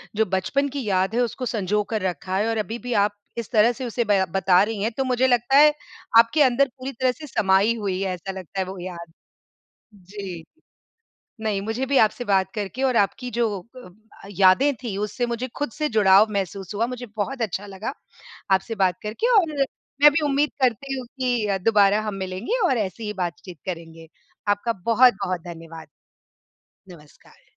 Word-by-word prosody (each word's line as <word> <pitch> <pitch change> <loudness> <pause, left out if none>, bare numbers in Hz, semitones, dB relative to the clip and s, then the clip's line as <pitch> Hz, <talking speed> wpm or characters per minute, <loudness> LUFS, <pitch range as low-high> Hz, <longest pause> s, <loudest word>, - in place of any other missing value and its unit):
जो 220 - +2
बचपन 200 +9 0
की 275 -1 -4
याद 190 +1 0
है 245 - +2
उसको 250 +2 -2
संजोकर 210 0 -1
रखा 185 +1 -2
है 210 - +1
और 225 - -1
अभी-भी 235 +3 -3
आप 205 0 -1 0.2
इस 230 0 -5
तरह 225 +1 +5
से 255 +2 -6
उसे 235 0 -1
बया 200 -2 +3
बता 185 +1 +3
रही 210 -1 -3
हैं 225 - 0
तो 270 - +1
मुझे 255 0 +2
लगता 245 +2 +3
है 300 +1 +7 0.5
आपके 230 +7 +4
अंदर 265 +2 +3
पूरी 260 +1 -5
तरह 255 0 0
से 300 +3 -11
समाई 200 0 +2
हुई 195 -3 -2
है 190 -1 -1
ऐसा 180 +2 -6
लगता 190 0 -7
है 190 - 0
वो 190 +1 -8
याद। 170 -2 -8 0.8
जी, 190 -3 -8 1.0
नहीं 210 -3 -1
मुझे 225 +5 -2
भी 275 0 +3
आपसे 220 +3 +2
बात 190 -2 +1
करके 210 +4 -4
और 255 -3 +2
आपकी 225 +5 0
जो 235 0 +1 0.3
अ, 245 -8 -11 0.4
यादें 200 +9 +4
थीं 220 -6 -4
उससे 210 +4 -2
मुझे 240 +2 -3
ख़ुद 290 -4 -2
से 305 +5 -2
जुड़ाव 205 -2 +5
महसूस 195 0 -4
हुआ। 230 +3 +1
मुझे 250 0 -6
बहुत 240 +4 -2
अच्छा 205 -1 -3
लगा 200 +6 -5 0.6
आपसे 190 +4 +1
बात 185 -3 +1
करके 225 - -1
और 325 -6 +1 0.5
मैं 295 - +10
भी 305 - +1
उम्मीद 290 +1 +1
करती 260 +2 0
हूँ 250 - -7
कि 225 -6 0
दोबारा 205 -2 +4
हम 210 -2 -4
मिलेंगे 190 - -3
और 260 -8 +1
ऐसी 205 +1 -3
ही 210 - -3
बातचीत 175 -1 -5
करेंगे। 165 -2 -7 0.4
आपका 205 +3 +1
बहुत-बहुत 210 -7 +3
धन्यवाद। 165 -2 -10 1.1
नमस्कार। 150 -3 -19
210 Hz, 180 wpm, -23 LUFS, 190-245 Hz, 1.1 s, मैं